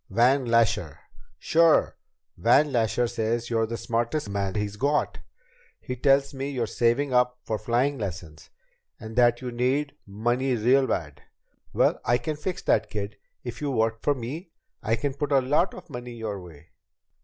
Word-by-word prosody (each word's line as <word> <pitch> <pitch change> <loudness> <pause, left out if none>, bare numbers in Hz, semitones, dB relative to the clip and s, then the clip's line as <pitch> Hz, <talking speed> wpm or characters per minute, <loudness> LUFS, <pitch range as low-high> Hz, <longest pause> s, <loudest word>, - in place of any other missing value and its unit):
"Van 125 +6 +3
Lasher." 115 -1 +2 0.4
"Sure. 165 -1 +3 0.4
Van 150 +1 +4
Lasher 120 0 +1
says 115 0 -2
you're 115 -1 +1
the 115 +1 -4
smartest 120 +5 -1
man 100 -2 -2
he's 105 -1 -2
got. 145 +6 0 0.6
He 125 - -5
tells 140 +2 +3
me 135 +1 -4
you're 125 -4 -1
saving 120 +5 +1
up 125 0 +3
for 110 -1 -3
flying 130 +4 0
lessons, 90 -6 -7 0.5
and 110 0 -9
that 120 0 +4
you 125 -1 -4
need 130 +4 0
money 120 +6 0
real 130 +4 +3
bad. 75 -4 -3 0.5
Well, - - +2
I 120 - +3
can 150 +5 -3
fix 180 +4 -4
that, 110 - +2
kid. 100 -1 -5 0.3
If 120 +1 -7
you 145 - -1
work 115 -3 0
for 145 - +1
me, 140 +9 -6 0.3
I 110 +2 +1
can 140 +4 -2
put 145 +1 -3
a 140 - +5
lot 150 +8 +1
of - - -11
money 120 -4 -7
your 110 -4 -5
way." 85 -2 -14
120 Hz, 165 wpm, -26 LUFS, 110-135 Hz, 0.6 s, a